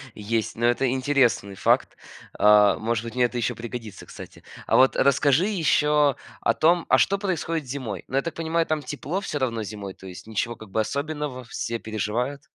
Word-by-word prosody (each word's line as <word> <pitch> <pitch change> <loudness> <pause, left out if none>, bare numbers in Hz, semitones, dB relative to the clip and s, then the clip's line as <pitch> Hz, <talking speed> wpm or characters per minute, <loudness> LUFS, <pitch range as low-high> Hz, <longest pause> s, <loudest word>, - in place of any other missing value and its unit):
есть. 110 +1 -2
Но 120 - -1
это 120 +2 +2
интересный 130 -6 +1
факт. - - +1 0.4
А, 105 -1 +6
может 115 0 -1
быть, 115 - -7
мне 125 -1 +3
это 120 +1 -3
еще 120 - 0
пригодится, 115 -3 -8
кстати. - - -12 0.2
А - - +2
вот 130 +1 +5
расскажи 140 +4 +3
еще 150 -7 +2 0.3
о - - +2
том, 170 +2 +3
а - - +6
что 200 - +2
происходит 165 -5 -2
зимой? 125 -8 -5
Ну, - - -5
я 135 - +3
так 165 - -4
понимаю, 165 0 0
там 155 -1 -1
тепло 150 +5 -4
всё 175 - -4
равно 115 -4 -1
зимой, 100 -2 -7
то 95 - -13
есть 90 -1 -10
ничего 115 +2 -2
как 110 -2 -13
бы 110 - -1
особенного, 145 +1 -4
все 115 0 -4
переживают. 110 +6 -3
130 Hz, 190 wpm, -24 LUFS, 110-150 Hz, 0.4 s, А